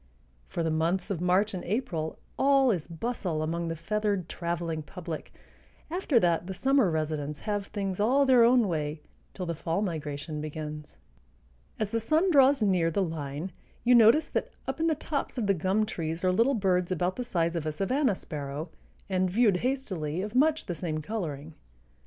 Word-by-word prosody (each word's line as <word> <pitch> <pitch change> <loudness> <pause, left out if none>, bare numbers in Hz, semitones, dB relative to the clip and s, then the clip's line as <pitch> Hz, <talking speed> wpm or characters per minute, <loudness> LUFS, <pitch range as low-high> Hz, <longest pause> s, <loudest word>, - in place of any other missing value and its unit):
For 170 - -3
the 165 - 0
months 170 +4 0
of 175 -4 -2
March 185 +4 +2
and 185 - -4
April 175 -7 -2 0.2
all 275 -2 +4
is 175 -7 -2
bustle 170 -3 -2
among 170 +2 -2
the 165 - -2
feathered 205 +1 -1
traveling 170 -2 -3
public; 165 0 -7 0.6
after 330 -8 +2
that 175 -2 +1
the 190 - -5
summer 265 -1 +3
residents 150 -2 -2
have 205 -2 -2
things 195 -3 -3
all 260 +7 +4
their 255 -3 +6
own 240 -2 +5
way 150 -3 -3 0.3
till 185 - -4
the 170 - -2
fall 165 +5 -1
migration 150 -3 -4
begins. 150 0 -6 0.8
As 210 -1 -1
the 230 - +1
sun 315 - +2
draws 275 -4 +5
near 180 -5 +3
the 195 +4 +1
line 160 +1 -4 0.3
you 245 +1 +5
notice 235 +6 +6
that - - -2 0.2
up - - -3
in 325 - +2
the 320 - +2
tops 285 -2 -3
of 235 - 0
the 200 - +3
gum 190 +5 +1
trees 165 -5 -4
are 185 - +3
little 235 +9 +3
birds 185 -4 +1
about 180 +1 0
the 250 - -3
size 170 -7 0
of 160 -2 -2
a - - 0
savanna 210 - +1
sparrow, 150 0 -6 0.4
and, 185 -1 +1
viewed 205 -1 +3
hastily, 185 - -2
of 210 +1 -5
much 305 +4 +3
the 175 - -3
same 155 -2 -3
coloring. 160 -7 -4
185 Hz, 180 wpm, -28 LUFS, 160-225 Hz, 0.8 s, their